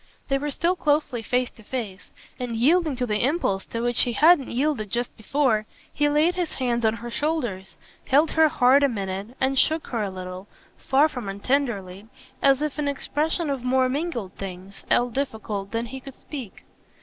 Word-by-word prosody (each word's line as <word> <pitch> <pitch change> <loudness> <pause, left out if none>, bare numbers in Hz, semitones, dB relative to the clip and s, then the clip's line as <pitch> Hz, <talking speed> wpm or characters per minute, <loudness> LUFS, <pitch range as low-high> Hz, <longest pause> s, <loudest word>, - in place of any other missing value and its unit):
They 275 0 +2
were 295 +1 -2
still 340 +5 +1
closely 290 -7 +1
face 245 +3 0
to - - -17
face, 210 -4 -6 0.3
and, 245 -2 -3
yielding 305 +5 +3
to 250 0 -1
the 210 -2 0
impulse 255 - 0
to 230 - -4
which 240 0 +2
he 240 - +2
hadn't 310 0 +5
yielded 250 -4 -1
just 240 +3 -2
before, 225 -2 +1 0.3
he 295 -1 +2
laid 305 +4 +3
his 355 -3 -3
hands 240 -2 -1
on 220 0 +3
her 235 +1 -7
shoulders, 235 -10 -2 0.3
held 290 +5 +4
her 320 0 +5
hard 260 +1 +5
a 280 - +4
minute 200 +1 -5
and 265 0 +2
shook 315 0 +2
her 235 -3 -1
a 205 - -1
little, 185 +1 -7 0.3
far 275 +3 +3
from 245 -9 -6
untenderly, 200 -3 -2 0.3
as 275 +1 +4
if 300 0 -3
in 295 - 0
expression 300 +3 -1
of 270 -3 -3
more 255 0 +3
mingled 260 - -3
things, 190 0 -8
all 245 0 +3
difficult, 220 -6 -3
than 230 +2 -2
he 265 +3 -7
could 270 0 -11
speak. 260 -10 -9
250 Hz, 185 wpm, -24 LUFS, 215-290 Hz, 0.3 s, hadn't